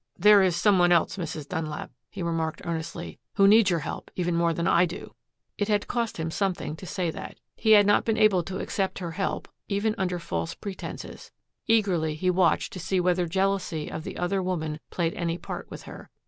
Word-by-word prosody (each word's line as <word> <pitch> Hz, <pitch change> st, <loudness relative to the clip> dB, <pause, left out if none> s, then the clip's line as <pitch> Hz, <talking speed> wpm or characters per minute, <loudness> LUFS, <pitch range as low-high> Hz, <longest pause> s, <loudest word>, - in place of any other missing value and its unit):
"There 210 Hz, +2 st, +7 dB
is 185 Hz, -3 st, +3 dB
some 190 Hz, +2 st, +4 dB
one 175 Hz, 0 st, +5 dB
else, 170 Hz, -2 st, +3 dB
Mrs. 160 Hz, -4 st, -5 dB
Dunlap," 160 Hz, -4 st, -4 dB, 0.2 s
he 195 Hz, -3 st, -6 dB
remarked 165 Hz, -1 st, -2 dB
earnestly, 170 Hz, 0 st, -5 dB, 0.2 s
"who 195 Hz, -, +6 dB
needs 210 Hz, 0 st, +6 dB
your 170 Hz, -3 st, +1 dB
help -, -, -6 dB
even 175 Hz, -1 st, 0 dB
more 170 Hz, 0 st, +2 dB
than 170 Hz, +1 st, -1 dB
I 175 Hz, +1 st, +4 dB
do." 170 Hz, -, -8 dB, 0.5 s
It 205 Hz, -, +1 dB
had 210 Hz, -1 st, +1 dB
cost 235 Hz, -2 st, -2 dB
him 160 Hz, 0 st, -3 dB
something 185 Hz, -5 st, -1 dB
to 185 Hz, -, -9 dB
say 180 Hz, -4 st, -1 dB
that. -, -, -8 dB, 0.2 s
He 220 Hz, -1 st, +4 dB
had 205 Hz, -1 st, +7 dB
not 205 Hz, -, +4 dB
been 225 Hz, -1 st, 0 dB
able 205 Hz, -4 st, +5 dB
to 190 Hz, 0 st, -4 dB
accept 195 Hz, -2 st, -2 dB
her 175 Hz, -3 st, -4 dB
help, 195 Hz, +4 st, -2 dB, 0.2 s
even 210 Hz, +2 st, 0 dB
under 180 Hz, -2 st, 0 dB
false 85 Hz, -, -3 dB
pretenses. 195 Hz, -2 st, -8 dB, 0.4 s
Eagerly 185 Hz, -9 st, +2 dB
he 180 Hz, +4 st, +1 dB
watched 175 Hz, -3 st, +2 dB
to 185 Hz, -, -6 dB
see 185 Hz, +2 st, 0 dB
whether 180 Hz, 0 st, +2 dB
jealousy 190 Hz, -3 st, -1 dB
of 155 Hz, -, -5 dB
the -, -, -6 dB
other 185 Hz, +2 st, 0 dB
woman 160 Hz, -4 st, -2 dB
played 170 Hz, -2 st, -1 dB
any 170 Hz, -1 st, -2 dB
part -, -, -7 dB
with -, -, -9 dB
her. -, -, -11 dB
180 Hz, 205 wpm, -26 LUFS, 165-195 Hz, 0.5 s, There